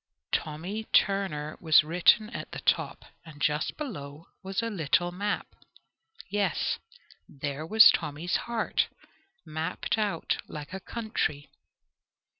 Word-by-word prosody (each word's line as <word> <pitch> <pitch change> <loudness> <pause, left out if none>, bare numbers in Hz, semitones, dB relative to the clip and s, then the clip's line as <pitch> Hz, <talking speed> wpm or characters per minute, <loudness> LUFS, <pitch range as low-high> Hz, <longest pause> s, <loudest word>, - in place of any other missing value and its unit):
"Tommy 175 +8 -2
Turner" 190 -9 +1
was 160 -2 +6
written 180 +7 +4
at - - -7
the - - -4
top, - - 0 0.2
and 155 -3 -13
just 150 +2 0
below 155 - -7
was 195 +3 -2
a 230 - -1
little 175 -1 +1
map, 205 +3 -3 0.7
yes, 200 -4 0 0.5
there 145 +2 -5
was 220 +4 +9
Tommy's 160 +2 -2
heart 235 -2 0 0.6
mapped 160 +7 -2
out 200 -6 0
like 150 +3 -8
a 190 - -4
country. 195 -10 -3
175 Hz, 115 wpm, -28 LUFS, 150-205 Hz, 0.7 s, was